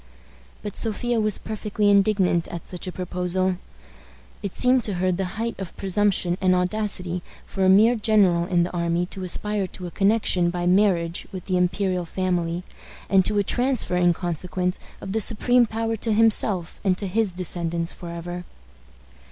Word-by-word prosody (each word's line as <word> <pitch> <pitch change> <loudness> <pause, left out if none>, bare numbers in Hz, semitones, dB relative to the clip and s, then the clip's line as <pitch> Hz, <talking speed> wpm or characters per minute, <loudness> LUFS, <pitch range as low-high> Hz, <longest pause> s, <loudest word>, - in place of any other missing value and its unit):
But 205 - -6
Sophia 235 +1 0
was 215 -1 0
perfectly 210 -1 -2
indignant 195 -4 +3
at 170 -1 -7
such 180 0 -7
a - - -3
proposal. 180 +1 -1 0.8
It 200 - -5
seemed 250 0 +3
to 205 - -2
her 185 +1 +1
the 190 +2 -3
height 230 +1 -2
of 190 -3 -7
presumption 190 -2 0
and 185 -1 +3
audacity 180 -1 -1 0.2
for 195 - -3
a 185 - +5
mere 215 +5 +6
general 205 -6 +3
in 175 -1 +2
the 175 - -3
army 170 0 0
to 190 - -6
aspire 205 +2 0
to 180 - -9
a 175 - -6
connection 195 -3 +2
by 175 0 -3
marriage 180 -3 +2
with 185 -3 -7
the 185 - -1
imperial 180 0 0
family, 175 -1 -2 0.5
and 190 -1 +5
to 210 - +1
a 205 - +3
transfer, 245 -3 0
in 175 -1 +4
consequence, 180 +1 -2 0.2
of 195 - -6
the 220 +2 0
supreme 240 +3 +4
power 225 +1 -2
to 225 +2 -2
himself 210 -5 +1
and 185 -2 +2
to 200 - -4
his 205 +1 0
descendants 170 -2 -2
forever. 175 0 -7
185 Hz, 170 wpm, -24 LUFS, 175-210 Hz, 0.8 s, mere